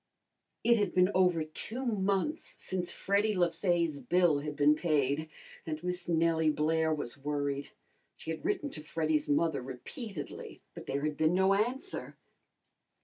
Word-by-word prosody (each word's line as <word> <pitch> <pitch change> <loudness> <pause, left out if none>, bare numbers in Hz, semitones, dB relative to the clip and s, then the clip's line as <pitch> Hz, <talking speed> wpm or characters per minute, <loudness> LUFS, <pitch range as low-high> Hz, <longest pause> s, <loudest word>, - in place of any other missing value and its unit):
] - - -53
It 235 0 +5
had 205 -3 0
been 180 +1 +5
over 180 -3 +3
two 220 +11 -4
months 200 - -1
since 180 -2 -3
Freddy 200 +1 +1
Le 175 -2 +3
Fay's 170 -3 0
bill 165 +2 +3
had 150 0 -5
been 145 +1 +5
paid, 150 -1 0 0.3
and 155 0 -5
Miss 180 0 -3
Nellie 165 -1 +3
Blair 160 +1 +1
was 145 -4 -4
worried. 145 0 -2 0.5
She - - -6
had 160 - -5
written 365 -6 -1
to 155 - -8
Freddy's 155 -1 -1
mother 145 -1 +2
repeatedly, 135 - -7
but - - -10
there 140 +1 -2
had 150 -1 -1
been 160 +2 +3
no 190 +1 +4
answer. 255 - -2
165 Hz, 155 wpm, -31 LUFS, 150-190 Hz, 0.5 s, It